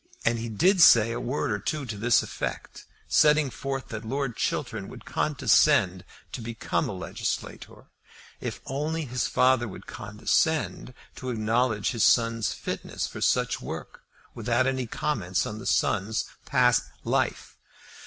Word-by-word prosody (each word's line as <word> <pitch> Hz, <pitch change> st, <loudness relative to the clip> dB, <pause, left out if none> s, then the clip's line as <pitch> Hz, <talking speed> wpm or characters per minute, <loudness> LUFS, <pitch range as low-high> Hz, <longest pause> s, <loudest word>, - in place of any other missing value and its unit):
And 115 Hz, 0 st, +2 dB
he 115 Hz, +1 st, -4 dB
did 180 Hz, -, +3 dB
say 115 Hz, -6 st, +7 dB
a 120 Hz, -, -3 dB
word 125 Hz, 0 st, -2 dB
or 105 Hz, -, -1 dB
two 150 Hz, +6 st, -3 dB
to 115 Hz, -4 st, -5 dB
this 115 Hz, +3 st, +3 dB
effect, -, -, -6 dB, 0.2 s
setting 150 Hz, -2 st, +4 dB
forth 135 Hz, 0 st, -4 dB
that 110 Hz, 0 st, -6 dB
Lord 135 Hz, +1 st, -2 dB
Chiltern 115 Hz, -8 st, -2 dB
would -, -, -11 dB
condescend 130 Hz, -, +2 dB, 0.3 s
to 125 Hz, -, -6 dB
become 115 Hz, 0 st, -2 dB
a -, -, -3 dB
legislator, -, -, -5 dB, 0.5 s
if -, -, -5 dB
only 155 Hz, +4 st, -2 dB
his 125 Hz, -1 st, -1 dB
father 125 Hz, -2 st, +3 dB
would 100 Hz, -, -10 dB
condescend 125 Hz, +4 st, -1 dB, 0.2 s
to 130 Hz, -, -5 dB
acknowledge 110 Hz, -2 st, +1 dB
his 115 Hz, -, 0 dB
son's 115 Hz, -1 st, +3 dB
fitness -, -, -4 dB
for -, -, -8 dB
such -, -, +1 dB
work -, -, -7 dB, 0.3 s
without 120 Hz, +2 st, +1 dB
any 130 Hz, -2 st, -1 dB
comments 100 Hz, -8 st, -1 dB
on 105 Hz, -, -5 dB
the 120 Hz, -, -7 dB
son's 110 Hz, +1 st, +1 dB, 0.2 s
past 125 Hz, -2 st, +4 dB, 0.2 s
life. -, -, -1 dB
120 Hz, 145 wpm, -27 LUFS, 110-135 Hz, 0.5 s, say